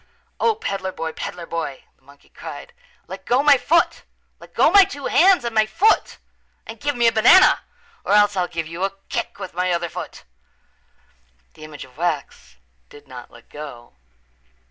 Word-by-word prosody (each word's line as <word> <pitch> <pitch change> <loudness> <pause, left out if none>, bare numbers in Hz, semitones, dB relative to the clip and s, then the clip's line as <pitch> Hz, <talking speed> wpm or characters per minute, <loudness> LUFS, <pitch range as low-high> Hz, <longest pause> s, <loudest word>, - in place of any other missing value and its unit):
"O, 455 -2 +2
peddler 195 - -4
boy, 160 -2 -5
peddler 170 +1 -7
boy," 165 -5 -5
the - - -39
monkey 140 +1 -21
cried, - - -10 0.3
"let 190 +1 -10
go 250 +7 +1
my 290 -1 +6
foot. 330 +6 +1 0.4
Let - - -17
go - - +4
my 400 -1 +8
two 290 -8 -7
hands 360 -4 +4
and 235 - -3
my 215 -1 +2
foot 390 - +1 0.5
and 225 0 -10
give 290 -1 -2
me 240 -1 +1
a 230 - +5
banana 235 +13 +6 0.4
or - - -1
else 205 -1 +4
I'll 180 -2 0
give 165 -2 -5
you 165 +3 -6
a 195 0 -3
kick 235 - -4
with 185 - -8
my 180 +1 -1
other 170 0 -2
foot." 180 +2 -9 1.3
The - - -15
image 155 -2 -10
of 125 0 -22
wax 145 - -4 0.3
did 145 -1 -16
not 125 -2 -11
let 115 - -18
go. 140 - -11
185 Hz, 180 wpm, -21 LUFS, 155-240 Hz, 1.3 s, my